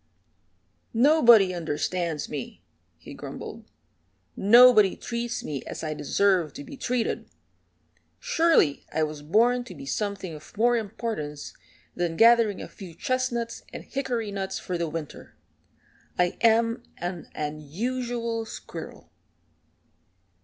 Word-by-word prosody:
"Nobody 235 Hz, -7 st, +6 dB
understands 165 Hz, 0 st, -2 dB
me," 145 Hz, -4 st, -7 dB, 0.3 s
he -, -, -11 dB
grumbled. -, -, -8 dB, 0.7 s
"Nobody 215 Hz, -1 st, +7 dB
treats 235 Hz, 0 st, -4 dB
me 140 Hz, -4 st, -4 dB
as -, -, -7 dB
I 155 Hz, -1 st, -2 dB
deserve 180 Hz, +1 st, +1 dB
to 285 Hz, -, -8 dB
be 285 Hz, -, -10 dB
treated. 250 Hz, -3 st, -2 dB, 0.9 s
Surely 330 Hz, -, +2 dB
I 160 Hz, -, +1 dB
was 150 Hz, -1 st, -4 dB
born 235 Hz, +11 st, +3 dB
to -, -, -10 dB
be 275 Hz, -, -9 dB
something 200 Hz, -8 st, -3 dB
of 155 Hz, +5 st, -13 dB
more 240 Hz, +2 st, +4 dB
importance 210 Hz, -9 st, -4 dB, 0.4 s
than 170 Hz, -2 st, -2 dB
gathering 230 Hz, -3 st, +5 dB
a -, -, -7 dB
few 180 Hz, -5 st, -11 dB
chestnuts 240 Hz, +1 st, -2 dB
and -, -, -7 dB
hickory 245 Hz, -6 st, -3 dB
nuts 195 Hz, -1 st, -3 dB
for 180 Hz, -, -4 dB
the 170 Hz, -2 st, -1 dB
winter. 155 Hz, -1 st, -7 dB, 0.8 s
I 180 Hz, 0 st, +2 dB
am 230 Hz, +1 st, +3 dB, 0.2 s
an 175 Hz, 0 st, -5 dB
unusual 230 Hz, -, -3 dB
squirrel." -, -, -9 dB
210 Hz, 115 wpm, -26 LUFS, 165-240 Hz, 0.9 s, Nobody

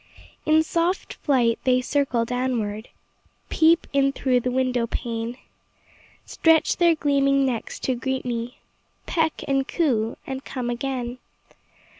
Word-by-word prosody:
In 315 Hz, +1 st, +5 dB
soft 340 Hz, +3 st, -1 dB
flight, 245 Hz, -5 st, +1 dB
they 255 Hz, -1 st, +3 dB
circle 255 Hz, -3 st, 0 dB
downward, 235 Hz, -3 st, -2 dB, 0.6 s
Peep 330 Hz, +1 st, +4 dB
in 275 Hz, 0 st, +3 dB
through 260 Hz, -2 st, +1 dB
the 250 Hz, -, -2 dB
window 250 Hz, -2 st, 0 dB
pane; 230 Hz, +1 st, -4 dB, 0.9 s
Stretch 325 Hz, -1 st, +3 dB
their 340 Hz, -2 st, +4 dB
gleaming 275 Hz, -2 st, +2 dB
necks 245 Hz, -4 st, -3 dB
to 260 Hz, -, 0 dB
greet 265 Hz, +1 st, -3 dB
me, 240 Hz, 0 st, -4 dB, 0.5 s
Peck 320 Hz, -2 st, 0 dB
and 270 Hz, 0 st, +1 dB
coo, 235 Hz, -10 st, 0 dB
and 265 Hz, 0 st, -5 dB
come 250 Hz, -2 st, -4 dB
again. 250 Hz, 0 st, -4 dB
260 Hz, 125 wpm, -24 LUFS, 240-280 Hz, 0.9 s, In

